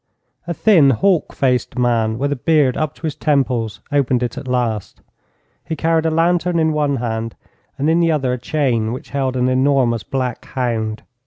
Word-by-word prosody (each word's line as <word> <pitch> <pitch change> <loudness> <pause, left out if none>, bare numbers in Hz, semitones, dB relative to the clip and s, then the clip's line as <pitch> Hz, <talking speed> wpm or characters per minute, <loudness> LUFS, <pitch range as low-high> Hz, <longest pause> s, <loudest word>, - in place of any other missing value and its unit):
A 170 - -1
thin, 170 -10 +5
hawk 175 - +2
faced 125 -1 0
man, 115 -3 +1
with 140 +3 -1
a - - +1
beard 145 -1 +2
up 155 -1 -2
to - - -22
his 155 -2 -1
temples, 130 -8 0
opened 130 -3 +1
it 120 -1 -3
at 140 0 -7
last. 120 -5 -2 0.6
He 160 - -4
carried 165 +1 +1
a - - +3
lantern 170 +2 +1
in 160 -1 +2
one 145 -2 +1
hand, 115 -2 -3 0.4
and 140 +2 0
in 165 +2 +3
the 165 -1 +3
other 135 -5 0
a 125 - -3
chain 120 -6 0
which 130 - -9
held 135 -2 -1
an 125 0 +1
enormous 130 -3 +2
black 130 -1 -3
hound. 115 -4 -3
135 Hz, 185 wpm, -19 LUFS, 120-155 Hz, 0.6 s, thin